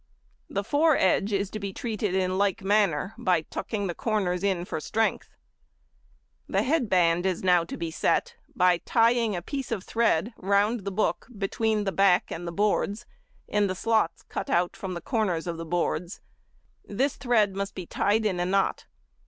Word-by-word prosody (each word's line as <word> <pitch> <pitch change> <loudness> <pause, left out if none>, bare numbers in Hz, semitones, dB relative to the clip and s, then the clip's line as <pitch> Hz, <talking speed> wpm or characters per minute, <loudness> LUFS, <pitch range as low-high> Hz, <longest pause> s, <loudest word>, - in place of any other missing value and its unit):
The 200 - -2
foredge 275 - +2
is 200 -1 -1
to 215 - -5
be 200 -1 -4
treated 210 -4 -2
in 185 0 0
like 200 -1 +1
manner, 195 -3 +1
by 185 -8 +2
tucking 205 +5 -4
the 175 - -2
corners 190 -4 -1
in 185 -3 0
for 160 - -4
strength. 220 +8 -1 1.2
The - - +1
head 275 -5 +1
band 175 -1 +3
is 185 -1 -2
now 180 -2 +4
to - - -7
be 170 -1 -4
set, 475 - 0 0.2
by 180 -5 +4
tying 230 -1 +2
a 175 - -4
piece 275 +1 -5
of 205 -5 -2
thread 225 -2 +1
round 200 +2 +1
the 200 - -2
book 210 +3 -1
between 210 +2 0
the 195 - -1
back 195 -2 +3
and 175 +1 -5
the - - -3
boards 205 +3 0 0.4
in 210 -1 +1
the 185 - -3
slots 220 -3 0
cut - - -5
out 175 +1 +1
from 190 -3 -5
the 170 - -5
corners 200 -9 -1
of 170 -2 -4
the 165 - -6
boards; 175 +1 -2 0.6
this 260 +7 -1
thread 220 -6 +2
must 200 0 -4
be 185 - -6
tied 210 +5 +1
in 185 -4 0
a 175 - +1
knot. 195 +1 0
200 Hz, 180 wpm, -26 LUFS, 180-220 Hz, 1.2 s, now